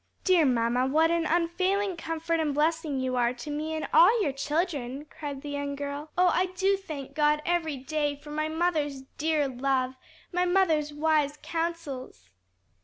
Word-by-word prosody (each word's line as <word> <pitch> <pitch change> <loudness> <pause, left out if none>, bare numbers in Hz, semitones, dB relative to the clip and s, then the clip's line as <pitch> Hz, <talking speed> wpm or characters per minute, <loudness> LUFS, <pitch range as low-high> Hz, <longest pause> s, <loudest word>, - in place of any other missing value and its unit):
"Dear 360 -5 +4
mamma, 245 +1 +2
what 320 +4 +3
an 335 -1 +1
unfailing 370 +3 +1
comfort 330 0 -2
and 300 -3 0
blessing 310 -2 +1
you 260 -1 -1
are 240 0 +2
to 245 +5 -7
me 310 +2 -3
and 315 - -3
to - - -9
all 405 +8 +6
your 285 - +1
children," 290 -2 -2
cried 290 -2 -7
the 295 - -6
young 285 0 -3
girl. 285 +2 -5
"Oh, 360 0 +5
I 370 +1 +2
do 380 +2 +1
thank 305 -9 -7
God 300 0 +3
every 330 -4 0
day 290 +2 -1
for 295 +1 -12
my 310 +1 -1
mother's 315 -5 -1 0.2
dear 305 -1 +1
love, 260 0 0 0.4
my 360 0 +1
mother's 335 -5 +2
wise 295 -1 +1
counsels!" 315 - -4
305 Hz, 175 wpm, -28 LUFS, 280-335 Hz, 0.4 s, all